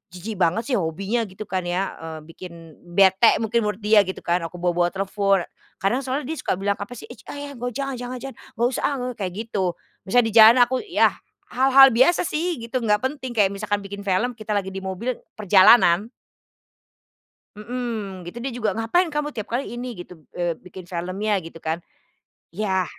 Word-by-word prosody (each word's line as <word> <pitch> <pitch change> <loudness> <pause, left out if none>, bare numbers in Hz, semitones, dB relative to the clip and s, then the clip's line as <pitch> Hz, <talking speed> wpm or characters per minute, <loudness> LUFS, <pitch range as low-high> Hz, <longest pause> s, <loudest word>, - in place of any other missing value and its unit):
jijik 195 +2 -6
banget 215 +9 +1
sih 240 - +2
hobinya." 195 +8 -2
Gitu 190 +3 -8
kan 185 -2 -3
ya, 185 +2 -1
eee, 160 -1 -7
bikin 165 -3 -12 0.2
bete 195 +3 +6
mungkin 230 +2 +1
menurut 210 -1 -3
dia 210 -2 +5
gitu 190 - -6
kan, 175 +1 +1
aku 180 - -15
bawa-bawa 175 0 +1
telepon. 195 0 0 0.4
Karena 235 +7 +2
soalnya 265 +2 -3
dia 320 - -4
suka - - -1
bilang, 200 +2 -1
"Apa 210 +5 -7
sih! - - -10
Ich! - - -14
Ach - - -7
ja 285 0 -6
joh, 245 -2 -5
jangan 275 -3 -3
jangan 250 +1 -5
jangan, 270 - -7 0.2
nggak 235 +1 +2
usah - - -4
ah," 285 - -1
ngo 250 - -2
kayak 185 -3 -3
gitu. 200 -5 -2 0.3
Misalnya 245 +3 +4
di - - -13
jalan 225 +2 +9
aku 255 +1 -1
ya 355 - +3 0.4
hal-hal 270 +1 +7
biasa 260 +11 +4
sih 340 +1 -1
gitu 250 +2 -2
nggak 210 -1 +1
penting 260 -3 -4
kayak 200 -2 +3
misalkan 205 0 -2
bikin 200 +1 -7
film 195 +7 +1
kita 215 -2 -4
lagi 190 -1 -2
di 195 - -5
mobil, 190 +6 -3 0.2
perjalanan. 200 -1 +5 1.5
Mhm, 215 -5 -5
gitu 235 - -8
dia 255 +1 -4
juga, 220 -4 0
"Ngapain 325 +10 +1
kamu 295 0 -3
tiap 215 - -5
kali 240 0 -3
ini," 240 -4 -6
gitu, 175 -2 -11 0.2
eee, 175 -1 0
"bikin 180 +1 -12
filmnya?" 185 +5 -2
gitu 165 0 -11
kan, 160 +2 -3 0.7
yah 190 -1 0
210 Hz, 195 wpm, -23 LUFS, 185-245 Hz, 1.5 s, jalan